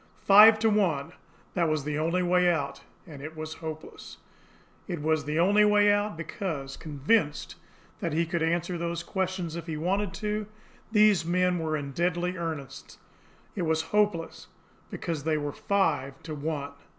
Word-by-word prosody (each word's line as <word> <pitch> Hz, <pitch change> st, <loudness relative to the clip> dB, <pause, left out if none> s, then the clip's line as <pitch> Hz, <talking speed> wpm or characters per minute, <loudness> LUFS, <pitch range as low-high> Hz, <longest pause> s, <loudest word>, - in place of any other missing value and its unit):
Five 215 Hz, +2 st, +8 dB
to 225 Hz, -, +4 dB
one! 165 Hz, -8 st, +1 dB, 0.4 s
That 170 Hz, -3 st, +1 dB
was 155 Hz, -2 st, 0 dB
the 150 Hz, +1 st, -2 dB
only 170 Hz, +3 st, +1 dB
way 180 Hz, 0 st, +3 dB
out 145 Hz, -4 st, -3 dB, 0.2 s
and 150 Hz, -6 st, -11 dB
it 155 Hz, +2 st, -8 dB
was 155 Hz, 0 st, -5 dB
hopeless. 155 Hz, -1 st, -8 dB, 0.7 s
It 175 Hz, -4 st, -4 dB
was 155 Hz, -1 st, +1 dB
the 150 Hz, +1 st, -2 dB
only 200 Hz, +5 st, +4 dB
way 205 Hz, 0 st, +5 dB
out, 205 Hz, -3 st, -1 dB
because, 155 Hz, -5 st, -5 dB
convinced 150 Hz, +2 st, 0 dB, 0.5 s
that 170 Hz, -, -2 dB
he 165 Hz, +3 st, +1 dB
could 170 Hz, 0 st, -2 dB
answer 170 Hz, +2 st, 0 dB
those 170 Hz, 0 st, -3 dB
questions 185 Hz, -4 st, -3 dB
if 170 Hz, 0 st, -6 dB
he 160 Hz, -2 st, -3 dB
wanted 190 Hz, +4 st, 0 dB
to, 210 Hz, 0 st, -3 dB, 0.4 s
these 210 Hz, -5 st, +5 dB
men 180 Hz, +1 st, +1 dB
were 155 Hz, -1 st, -1 dB
in 140 Hz, -1 st, -5 dB
deadly 175 Hz, +3 st, -1 dB
earnest; 160 Hz, -6 st, -6 dB, 0.6 s
it 190 Hz, -, -2 dB
was 160 Hz, -1 st, +1 dB
hopeless, 205 Hz, -6 st, 0 dB, 0.4 s
because 160 Hz, -4 st, -4 dB
they 155 Hz, 0 st, +1 dB
were 145 Hz, -1 st, -3 dB
five 160 Hz, -10 st, 0 dB
to 155 Hz, -, -6 dB
one! 145 Hz, -1 st, -4 dB
170 Hz, 160 wpm, -27 LUFS, 155-190 Hz, 0.7 s, Five